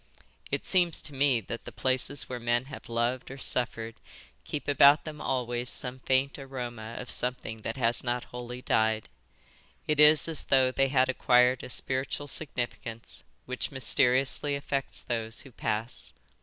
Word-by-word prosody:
It - - -3
seems 175 -3 +2
to 145 - -5
me 135 -3 +2
that 115 +3 -7
the - - -8
places 130 +2 0
where 125 -1 -5
men 120 +1 0
have 135 -3 -10
loved 120 +2 -1
or 135 - -8
suffered 115 -3 0 0.5
keep 150 - -5
about 145 +1 +6
them 150 -1 -7
always 120 -1 -2
some 125 0 +1
faint 130 +2 0
aroma 120 -4 -7
of 125 - -7
something 120 -3 -2
that 115 - -5
has 120 -2 +1
not 125 0 -1
wholly 125 +1 -7
died. 110 -1 +1 0.8
It 150 -1 +1
is 150 +1 +7
as 160 -3 -1
though 130 -1 +3
they 135 +1 +2
had 130 -1 +2
acquired 125 -1 +3
a - - -8
spiritual 135 +3 -1
significance 120 -5 -3 0.2
which 130 0 -4
mysteriously 130 +1 +2
affects 140 -1 -2
those 115 -1 -2
who 135 -4 -14
pass. 115 +1 -2
130 Hz, 155 wpm, -28 LUFS, 120-135 Hz, 0.8 s, is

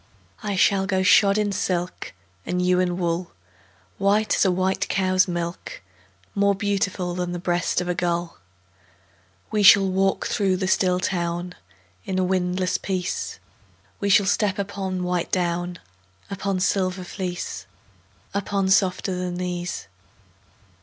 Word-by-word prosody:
I 205 -2 -2
shall 195 0 +3
go 190 -1 +1
shod 200 +1 +5
in 210 -1 +1
silk, 180 -2 -2 0.3
And 180 - -2
you 180 0 +2
in 180 -1 0
wool, 175 0 -2 0.7
White 205 +2 +2
as - - +3
a 195 - +3
white 190 +2 0
cow's 185 -1 +2
milk, 175 0 -4 0.5
More 200 0 +2
beautiful 195 -2 -1
Than 180 0 -3
the - - -3
breast 175 0 0
of 180 - -4
a 180 - +1
gull. 175 -1 -2 1.1
We 215 - +1
shall 195 0 +8
walk 190 +1 +1
through 195 -3 +1
the 185 0 -2
still 180 -1 +2
town 175 -1 -2 0.5
In 190 - -3
a 185 - +2
windless 185 0 0
peace; 185 -2 -3 0.6
We 200 -2 -1
shall 200 0 +5
step 205 0 +1
upon 190 -2 -3
white 180 -1 -1
down, 175 0 -1 0.5
Upon 195 -1 -2
silver 185 0 0
fleece, 175 - -5 0.7
Upon 200 -1 0
softer 190 0 +2
than 180 -1 -3
these. 180 -1 -4
185 Hz, 140 wpm, -23 LUFS, 180-195 Hz, 1.1 s, shall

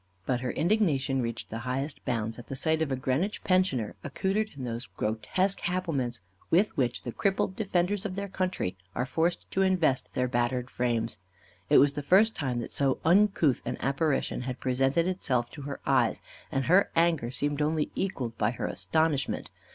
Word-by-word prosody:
But 125 -2 0
her 130 - -2
indignation 150 - +1
reached 115 -1 -4
the 115 - -3
highest 130 +5 -3
bounds 115 -2 -2
at 120 - -11
the 135 - -5
sight 160 +4 +1
of 155 -3 0
a - - +2
Greenwich 135 +11 -1
pensioner 185 - +1
accoutred 195 +9 -1
in 135 - -5
those 115 -1 -4
grotesque 110 - -1
habiliments 145 - -1 0.3
with 190 +6 +3
which 125 -5 0
the 120 - -4
crippled 195 - 0
defenders 190 -1 0
of 190 -3 -4
their 200 0 -3
country 185 - -2 0.2
are 125 - 0
forced 165 +6 0
to 190 - +1
invest 180 -8 +1
their 125 - +1
battered 120 +1 -1
frames. 115 -3 -1 0.5
It - - +7
was 140 0 +6
the 145 - -3
first 195 +9 +4
time 130 -5 -2
that - - -7
so 135 -2 +1
uncouth 175 -6 +4
an 125 - -3
apparition 140 +1 0
had 125 0 -4
presented 135 +5 +2
itself 125 -10 -1
to 145 - -9
her 140 - -5
eyes, 130 -4 +2 0.3
and 135 -1 0
her 185 +4 +5
anger 165 -7 +2
seemed 145 +3 -2
only 155 0 0
equalled 130 -12 -3
by 105 - +3
her 120 - -4
astonishment. 160 -3 0
140 Hz, 180 wpm, -28 LUFS, 125-180 Hz, 0.5 s, It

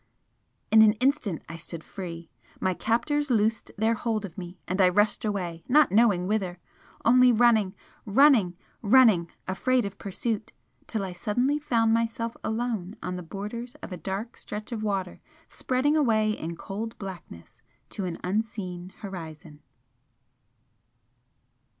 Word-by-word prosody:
In 220 - +8
an 215 -1 +7
instant 245 - 0
I 165 - -7
stood 165 0 -8
free. 170 -4 -8 0.3
My 185 - +1
captors 290 - 0
loosed 220 -2 +1
their 220 +2 +2
hold 220 -2 -2
of 175 - -10
me, 180 0 -8
and 185 +3 0
I 185 - +6
rushed 205 +6 +2
away, 180 -6 -3
not 295 +2 +5
knowing 205 -4 +4
whither 190 -3 -1 0.5
only 250 +1 +6
running, 220 -4 +3 0.3
running, 215 -6 +4 0.2
running, 215 -7 +5 0.2
afraid 245 +5 +1
of 200 0 -7
pursuit 215 +2 -3 0.3
till 215 -3 -2
I 185 -2 -5
suddenly 245 +10 0
found 230 -6 +2
myself 230 0 -1
alone 220 -4 -2
on 180 - -3
the 180 - -5
borders 210 +7 -6
of - - -7
a - - -3
dark 195 +7 -5
stretch 210 +3 -7
of 225 -2 -3
water 195 -4 -2 0.3
spreading 265 +4 0
away 220 -8 +3
in 170 -5 -4
cold 215 +6 -6
blackness 180 - -10 0.3
to 195 - -4
an 175 -2 -4
unseen 185 -2 -3
horizon. 160 -6 -8
210 Hz, 140 wpm, -27 LUFS, 185-230 Hz, 0.5 s, In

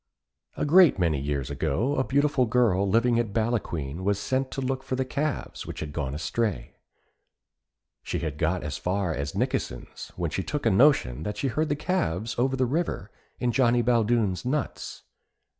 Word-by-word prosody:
A - - 0
great 170 - +6
many 85 -6 +1
years 70 -1 -2
ago 125 - 0
a 130 - +2
beautiful 140 -2 +2
girl 105 -5 +2
living 115 +3 +3
at 110 -4 -2
Ballaquine 95 - -2
was 100 0 +1
sent 130 +6 -1
to - - -5
look 130 0 -1
for 130 - -3
the 130 0 -1
calves, 140 +2 -3
which - - -6
had 75 -1 -5
gone 70 -3 -3
astray. 105 +6 -2 1.2
She - - -3
had 75 -2 -4
got 85 +2 0
as 75 -1 -4
far 90 -2 -1
as 70 -1 -3
Nikkesen's, 60 - -3
when 85 -3 -2
she 95 - -1
took 145 +9 -4
a - - +4
notion 95 - +4
that 105 +5 -4
she 135 - 0
heard 155 +5 -1
the 145 - +1
calves 145 - -1
over 130 +2 +2
the 130 -1 +1
river 135 - -2 0.3
in 125 - +1
Johnny 120 -1 +3
Baldoon's 115 -5 +2
nuts. 140 +3 -3
115 Hz, 175 wpm, -26 LUFS, 85-130 Hz, 1.2 s, great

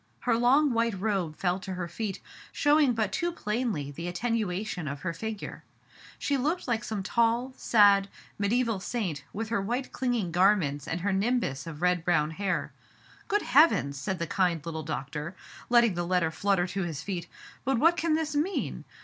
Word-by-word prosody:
Her - - +2
long 260 +4 +4
white 230 -4 0
robe 190 -6 -1
fell 180 0 0
to 190 0 -6
her 180 -1 -3
feet, 195 +3 -4 0.3
showing 290 -3 +4
but 220 -2 0
too 345 0 -1
plainly 210 - -2
the 170 +5 -6
attenuation 200 -3 -2
of 140 0 -5
her 170 0 -2
figure. 215 +4 -6 0.5
She 285 - 0
looked 305 +7 -1
like 235 -2 0
some 215 -4 -3
tall, 235 +4 +1
sad, 200 -4 +5 0.3
medi 230 +5 +2
aeval 220 -5 -2
saint, 185 - -3
with 220 +1 -4
her 230 -3 0
white 245 +6 -2
clinging 240 -8 -1
garments 175 -6 +2
and 165 +1 -2
her 200 +2 0
nimbus 195 - 0
of 160 0 -7
red 180 -2 +2
brown 155 -3 +2
hair. 195 +3 -2 0.3
" - - -26
Good 415 0 +1
Heavens! 255 - +4
'* - - -8
said 190 +6 -2
the 170 - -2
kind 170 -3 0
little 160 -1 -4
doctor, 150 +3 -5 0.3
letting 235 -3 +5
the 175 0 -2
letter 180 -3 +2
flutter 195 0 +1
to 185 +2 -3
his 160 -4 -4
feet. 175 -4 -4 0.4
"But 265 0 +1
what 330 +7 +5
can 325 -1 +1
this 310 -1 -2
mean 330 +7 -1
200 Hz, 185 wpm, -28 LUFS, 175-240 Hz, 0.5 s, sad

